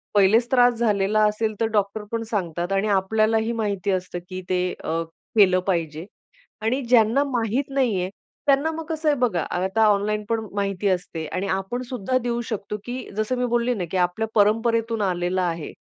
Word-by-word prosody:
पहिलेच 220 +5 +4
त्रास 245 -1 +5
झालेला 215 -2 +2
असेल 215 +1 -1
तर - - +4
डॉक्टर 205 0 0
पण 230 0 -1
सांगतात 175 -3 -2
आणि 195 +2 +1
आपल्यालाही 220 +3 +2
माहिती 205 -4 -1
असतं 185 -1 -2
की 185 0 -5
ते 180 -1 +1 0.2
अ, 165 +1 -1 0.4
केलं 185 -3 +6
पाहिजे. 165 -3 -1 0.6
आणि 245 +5 0
ज्यांना 240 +2 +4
माहित 250 0 -1
नाहीये 230 -10 0 0.4
त्यांना 285 +3 +3
मग 325 0 -6
कसं 315 -1 -2
आहे 290 - +2
बघा, 225 -9 +1
आता 190 +5 +1
ऑनलाईन 210 +1 +1
पण 230 -1 +1 0.2
माहिती 200 0 -1
असते 175 -3 -2
आणि 185 +4 -3
आपण 195 +6 -2
सुद्धा 255 0 -1
देऊ 240 -1 -1
शकतो, 210 -1 -4
की 250 +1 -5
जसं 215 +4 -1
मी 250 - 0
बोलले 240 +1 +1
ना 185 -6 -3
की 190 - 0
आपल्या 180 +5 0
परंपरेतून 225 +2 +2
आलेलं 180 -1 0
आहे, 170 -3 -2
210 Hz, 175 wpm, -23 LUFS, 190-235 Hz, 0.6 s, केलं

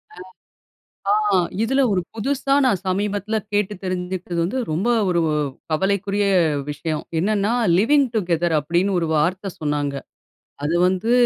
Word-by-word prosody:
அ, - - -19 1.2
ஆ, - - +5 0.3
இதில 270 +4 +2
ஒரு 185 - +1
புதுசா 275 +4 -1
நான் 200 -8 +2
சமீபத்தில 205 +2 -1 0.2
கேட்டு 205 0 +1
தெரிஞ்சுக்கிறது 180 -1 -3
வந்து, 200 +10 -1
ரொம்ப 175 +9 -1 0.2
ஒரு 175 -1 +2 0.5
கவலைக்குரிய 200 +4 0 0.4
விஷயம். 155 +1 -3 0.2
என்னன்னா, 205 +3 +1 0.3
"லிவிங் 275 +7 +4
டுகெதர்" 175 -4 +1
அப்படின்னு 175 +6 0
ஒரு 165 - -1
வார்த்தை 185 +6 0
சொன்னாங்க. 145 -2 -1 0.7
அது 155 +3 0
வந்து, 190 +5 0
190 Hz, 125 wpm, -21 LUFS, 170-210 Hz, 1.2 s, ஆ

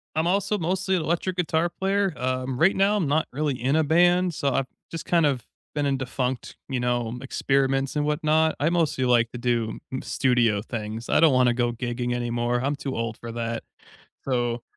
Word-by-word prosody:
I'm 160 +1 +1
also 200 +3 +1
mostly 190 +2 0
electric 175 +2 -1
guitar 170 -1 +1
player. 195 +1 0
Um, 130 0 -2
right 185 +7 +4
now, 200 +2 +3
I'm 175 -8 0
not 155 +3 +2
really 145 +1 -1
in 135 +5 +1
a 160 - +3
band, 175 +3 +3
so 140 -1 0
I've 135 - 0 0.2
just 165 - -6
kind 170 -2 +3
of 135 -5 0 0.3
been 145 -1 0
in 140 -1 +1
defunct, 130 -1 -3
you 130 -3 -2
know, 120 -1 -1
experiments 135 0 0
and 145 - +1
whatnot. 155 +1 +2
I 145 - +3
mostly 165 -6 +1
like 120 -2 +3
to 120 - -6
do 120 -2 -1
m 130 - -3
studio 120 -5 +2
things. 110 +1 -6
I - - +3
don't 160 -3 +6
wanna 125 -1 +4
go 120 -1 0
gigging 120 +1 -3
anymore; 120 0 -1
I'm 140 +2 0
too 135 -2 -4
old 115 -1 -3
for 115 -1 -8
that. 115 0 -3 0.6
So, 120 -2 0
135 Hz, 195 wpm, -25 LUFS, 120-160 Hz, 0.6 s, don't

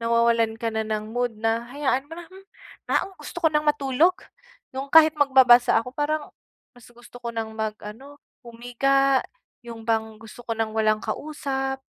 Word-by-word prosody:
nawawalan 230 -1 +1
ka 230 - -1
na 220 0 -2
ng 215 0 -4
mood, 245 -1 0
na 225 +1 0
hayaan 275 -1 -1
mo 310 - -17
na, 345 - -9
hmm. 380 +1 -15 0.5
Ah, - - +1
o 385 - -19
gusto - - -9
ko 320 - +4
ng 300 0 0
matulog, 295 +3 +2 0.6
yung 275 +1 -5
kahit 315 -1 +7
magbabasa 260 -5 +5
ako, 250 +5 -10
parang 295 +1 -1 0.5
mas 245 - -17
gusto 240 +1 -16
ko 235 -1 -4
ng 220 -1 -5
mag-ano, 220 +6 -7 0.2
humiga, 260 +3 +1 0.4
yung 230 -1 -9
bang 220 -1 -1
gusto 225 +2 -13
ko 230 - -3
ng 225 -1 -2
walang 215 -1 +2
kausap, 270 -2 -4
245 Hz, 170 wpm, -24 LUFS, 225-285 Hz, 0.6 s, kahit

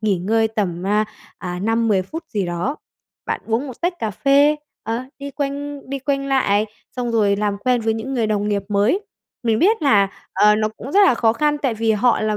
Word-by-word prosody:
nghỉ 205 -4 +1
ngơi 220 +4 +1
tầm 190 -6 -2
á, 210 +3 +2 0.3
ờ, 180 -1 -5
5-10 225 -3 +2
phút 325 - -7
gì 200 -4 -2
đó. 175 - -2 0.5
Bạn - - -2
uống 230 +5 0
một 255 -4 -9
tách 350 +1 0
cà 220 -6 -2
phê, 280 +7 +4 0.3
ờ, 230 +3 -3
đi 280 0 -6
quanh 285 +1 -4
đi 275 - -2
quanh 275 0 -1
lại, 220 -6 +2 0.3
xong 245 -1 -2
rồi 210 -3 +2
làm 205 -1 -1
quen 245 +2 +1
với 225 0 0
những 225 +5 -4
người 235 -3 +1
đồng 210 -1 0
nghiệp 200 -1 0
mới. 210 - +2 0.4
Mình 225 -2 +1
biết 420 - +3
là, 205 -9 +4 0.2
ờ, 210 0 +5
nó 215 0 +1
cũng 270 - -8
rất 400 - +5
là 255 - +4
khó 225 -1 +3
khăn 295 +5 +1
tại 265 -5 0
vì 225 0 +1
họ 230 +3 +2
là 215 -1 0
225 Hz, 220 wpm, -20 LUFS, 210-275 Hz, 0.5 s, ờ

